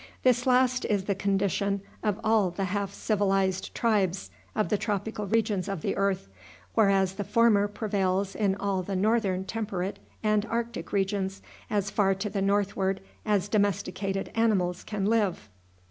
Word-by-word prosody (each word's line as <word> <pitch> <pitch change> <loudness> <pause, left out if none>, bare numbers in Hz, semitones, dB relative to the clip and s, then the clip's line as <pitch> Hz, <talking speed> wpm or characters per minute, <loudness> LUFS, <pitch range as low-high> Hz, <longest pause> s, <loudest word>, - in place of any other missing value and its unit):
This 250 0 +3
last 250 0 +3
is 205 -3 +1
the 200 - 0
condition 200 0 0 0.2
of 210 -1 0
all 215 -4 +3
the 180 +3 -3
half 200 +1 -1
civilized 195 -3 0
tribes 195 - +1 0.2
of - - +1
the 210 - +2
tropical 210 0 -2
regions 210 -3 +1
of 195 -5 -3
the - - 0
earth, 195 - 0 0.5
whereas 195 -3 +3
the 205 +1 -4
former 215 -1 +4
prevails 195 -2 -1
in 200 -3 +1
all 200 -1 -1
the 195 +2 -4
northern 195 -2 +1
temperate 200 -3 -3 0.2
and 215 -1 +2
arctic 230 -7 -3
regions, 195 -1 -1 0.3
as 200 -1 0
far 195 -2 +2
to 200 +2 -4
the 200 -1 -1
northward 195 -1 +1 0.3
as 205 -2 +2
domesticated 195 -1 -1
animals 190 -6 +1
can 205 -2 -3
live. 205 - +1
200 Hz, 150 wpm, -28 LUFS, 190-215 Hz, 0.5 s, former